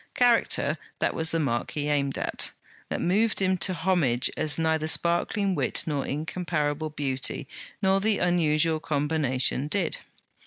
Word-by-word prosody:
Character, 245 Hz, -2 st, +2 dB, 0.2 s
that -, -, 0 dB
was 160 Hz, 0 st, +1 dB
the 165 Hz, -, 0 dB
mark 120 Hz, -6 st, -1 dB
he 150 Hz, -1 st, -2 dB
aimed 140 Hz, -2 st, 0 dB
at; -, -, 0 dB, 0.4 s
that -, -, -2 dB
moved 210 Hz, +5 st, +1 dB
him 190 Hz, -1 st, +2 dB
to 185 Hz, 0 st, +2 dB
homage 165 Hz, -9 st, +2 dB
as 150 Hz, -, 0 dB
neither 160 Hz, -1 st, +1 dB
sparkling 175 Hz, +5 st, +1 dB
wit -, -, +1 dB
nor 145 Hz, -3 st, -2 dB
incomparable 155 Hz, 0 st, -2 dB
beauty, 135 Hz, -1 st, -2 dB, 0.4 s
nor 190 Hz, 0 st, +3 dB
the 215 Hz, 0 st, +2 dB
unusual 160 Hz, -2 st, +2 dB
combination, 145 Hz, -2 st, 0 dB
did. 175 Hz, +2 st, 0 dB
160 Hz, 145 wpm, -26 LUFS, 145-180 Hz, 0.4 s, nor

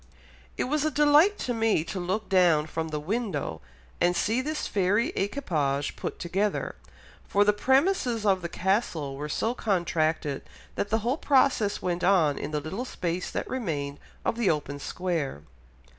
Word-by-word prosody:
It -, -, +1 dB
was 295 Hz, +3 st, 0 dB
a 310 Hz, -, +2 dB
delight 300 Hz, +7 st, +5 dB
to 245 Hz, -, -1 dB
me 225 Hz, -7 st, +2 dB
to 185 Hz, +3 st, -5 dB
look 185 Hz, +5 st, -2 dB
down 175 Hz, -5 st, +4 dB
from 160 Hz, +1 st, -3 dB
the 155 Hz, -1 st, -3 dB
window 165 Hz, -, -3 dB, 0.4 s
and 175 Hz, 0 st, +3 dB
see 225 Hz, +8 st, +1 dB
this 305 Hz, +3 st, -3 dB
fairy 205 Hz, -, +1 dB
equipage 155 Hz, -, -1 dB
put -, -, -5 dB
together, 195 Hz, +4 st, -1 dB, 0.5 s
for 205 Hz, -, +4 dB
the 210 Hz, -, +4 dB
premises 265 Hz, -, +2 dB
of 190 Hz, -2 st, +3 dB
the 170 Hz, -, -4 dB
castle 175 Hz, -8 st, -1 dB
were 150 Hz, +2 st, -5 dB
so 225 Hz, +10 st, 0 dB
contracted 165 Hz, -, 0 dB, 0.3 s
that 205 Hz, -, -2 dB
the 220 Hz, -, +2 dB
whole 255 Hz, +5 st, +1 dB
process 260 Hz, -9 st, +2 dB
went 175 Hz, 0 st, -1 dB
on 175 Hz, -6 st, +3 dB
in -, -, -4 dB
the 150 Hz, -1 st, -1 dB
little 160 Hz, -, -4 dB
space 180 Hz, -7 st, -3 dB
that -, -, -3 dB
remained 145 Hz, -, -3 dB, 0.3 s
of 230 Hz, -, 0 dB
the 235 Hz, -5 st, +2 dB
open 145 Hz, -2 st, -1 dB
square.... 155 Hz, -, -3 dB
190 Hz, 165 wpm, -27 LUFS, 155-235 Hz, 0.5 s, delight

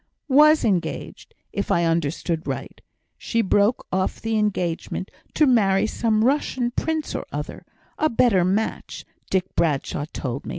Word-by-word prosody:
"Was 300 Hz, +3 st, +6 dB
engaged; 190 Hz, -6 st, -2 dB, 0.2 s
if 200 Hz, -, -3 dB
I 170 Hz, -, +2 dB
understood 165 Hz, 0 st, -1 dB
right, -, -, -5 dB, 0.4 s
she 230 Hz, -1 st, 0 dB
broke 205 Hz, +4 st, +2 dB
off 185 Hz, 0 st, -1 dB
the 225 Hz, 0 st, -2 dB
engagement 185 Hz, -3 st, -2 dB, 0.2 s
to 305 Hz, -, +5 dB
marry 205 Hz, -7 st, +3 dB
some 220 Hz, 0 st, +1 dB
Russian 260 Hz, -3 st, 0 dB
prince 315 Hz, +4 st, -2 dB
or -, -, -3 dB
other -, -, -6 dB, 0.3 s
a 310 Hz, -, +3 dB
better 225 Hz, -6 st, +3 dB
match, 200 Hz, +5 st, -2 dB, 0.2 s
Dick 190 Hz, -1 st, -1 dB
Bradshaw 145 Hz, -2 st, 0 dB
told 130 Hz, +1 st, -5 dB
me. -, -, -5 dB
200 Hz, 140 wpm, -23 LUFS, 175-240 Hz, 0.4 s, Was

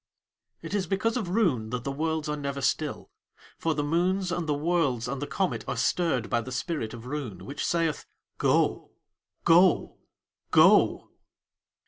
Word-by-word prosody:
It -, -, -6 dB
is 195 Hz, -4 st, 0 dB
because 215 Hz, +5 st, 0 dB
of 220 Hz, -8 st, -2 dB
Roon 170 Hz, -, +1 dB
that 125 Hz, 0 st, -4 dB
the 140 Hz, -, -3 dB
worlds 160 Hz, +2 st, -2 dB
are 150 Hz, -, -1 dB
never 140 Hz, -1 st, -4 dB
still, 135 Hz, -, -2 dB, 0.5 s
for 160 Hz, -1 st, 0 dB
the 145 Hz, -, -1 dB
moons 180 Hz, +4 st, 0 dB
and 170 Hz, -3 st, -2 dB
the -, -, +3 dB
worlds 145 Hz, -7 st, 0 dB
and 135 Hz, +2 st, -4 dB
the 145 Hz, -, -3 dB
comet 190 Hz, -2 st, -1 dB
are -, -, -3 dB
stirred 160 Hz, -10 st, +1 dB
by 120 Hz, -, 0 dB
the 130 Hz, -, -8 dB
spirit 125 Hz, -3 st, -3 dB
of 115 Hz, 0 st, -11 dB
Roon, 125 Hz, -10 st, -5 dB
which 145 Hz, +6 st, -5 dB
saith: 165 Hz, -3 st, 0 dB, 0.3 s
"Go! -, -, +1 dB, 0.5 s
Go! 175 Hz, +1 st, +4 dB, 0.5 s
Go!" -, -, +4 dB
150 Hz, 160 wpm, -27 LUFS, 130-175 Hz, 0.5 s, Go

